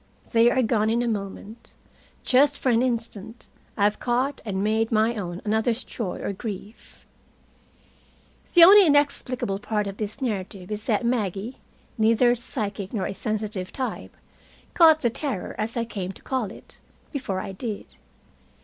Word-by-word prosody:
They 230 0 +5
are 260 +1 +2
gone 220 -2 +1
in 235 +2 +1
a - - -1
moment. 210 +1 -6 0.5
Just 285 +3 +4
for 260 - 0
an 235 -1 +3
instant, 230 -3 -3 0.3
I 200 - +1
have 210 +1 +2
caught 255 +3 -1
and 195 -3 -2
made 220 +2 +1
my 220 +1 +3
own 180 -4 -5
another's 220 +3 +1
joy 210 -7 -5
or - - -2
grief. 205 +1 -9 1.5
The 345 - +10
only 390 +1 +9
inexplicable 280 -8 +1
part 210 0 -1
of 195 0 -6
this 210 +2 -5
narrative 195 -6 -4
is 210 +1 -3
that 225 0 +1
Maggie, 225 -1 -2 0.4
neither 230 +2 +4
a - - +2
psychic 210 -4 -5
nor 200 -5 -1
a - - -3
sensitive 210 -3 -3
type, 260 -2 -5 0.6
caught 320 -2 +6
the 235 - +1
terror, 260 -6 -4
as 225 +3 -2
I 235 - 0
came 190 -5 -5
to - - -16
call 260 -4 -1
it, - - -14 0.3
before 255 - -3
I 195 - -5
did. 210 +2 -5
225 Hz, 160 wpm, -25 LUFS, 205-250 Hz, 1.5 s, The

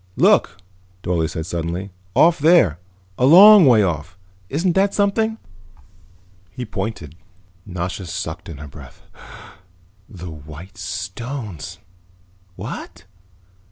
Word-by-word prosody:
"Look," - - +3 0.5
Dorle 85 -3 0
said 80 -1 -5
suddenly. 85 +3 -4 0.2
"Off 170 0 +4
there, 140 - +4 0.4
a 125 - +4
long 195 +2 +9
way 115 -5 +5
off. 85 0 -3 0.3
Isn't 170 +6 0
that 195 +2 +1
something?" 220 +2 +1 1.1
He 125 +9 -7
pointed. 95 -8 -5 0.5
Nasha 90 0 -5
sucked 85 -1 -6
in 80 - -8
her 75 +1 -9
breath. 70 - -14 1.1
"The 90 -2 -9
white 80 +5 -12
stones." 95 - -6 0.8
"What?" - - -8
95 Hz, 105 wpm, -20 LUFS, -, 1.1 s, long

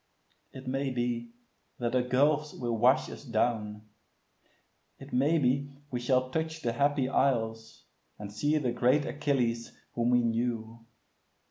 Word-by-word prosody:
It 130 0 -10
may 135 +2 -1
be 120 -2 -2 0.5
that 120 -1 -1
the 125 0 +2
gulfs 145 +4 +2
will 120 -2 -2
wash 125 +4 +4
us - - -9
down; 110 -4 -1 1.1
It 135 - -12
may 145 +6 +3
be 140 0 +1 0.2
we 125 - -1
shall 130 +1 +1
touch 160 +1 -3
the 115 - 0
Happy 140 +1 +2
Isles, 115 -5 0 0.3
And 105 -1 -8
see 145 +8 +1
the 130 -5 0
great 125 +5 +2
Achilles, 125 -6 -1 0.2
whom 120 0 +1
we 125 -1 +4
knew. 115 -1 -2
125 Hz, 140 wpm, -30 LUFS, 115-140 Hz, 1.1 s, wash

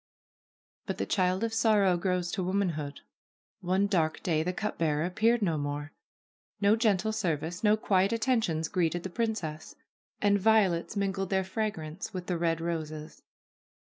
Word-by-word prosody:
But - - -3
the - - -1
child 185 +1 +1
of 225 -1 -1
sorrow 215 -5 +3
grows 180 -1 -1
to 195 - -2
womanhood. 175 -6 -2 0.6
One 190 +1 +1
dark 165 -6 0
day 160 -3 +1
the 180 +3 -1
cup 210 +3 -4
bearer 155 -1 +1
appeared 220 +5 +2
no 165 -5 +1
more. 145 +1 -4 0.7
No 205 +1 +4
gentle 220 -2 +1
service, 175 -4 -2
no 210 0 +4
quiet 195 -2 +2
attentions 225 -9 +1
greeted 175 -1 0
the 190 - -4
princess. 180 -9 -3 0.4
And 205 0 +3
violets 200 -4 +2
mingled 195 -1 -1
their 190 -1 +1
fragrance 190 -1 -4
with 180 -1 -4
the 175 -2 -2
red 165 -1 +1
roses. 155 -2 -5
185 Hz, 150 wpm, -29 LUFS, 165-210 Hz, 0.7 s, No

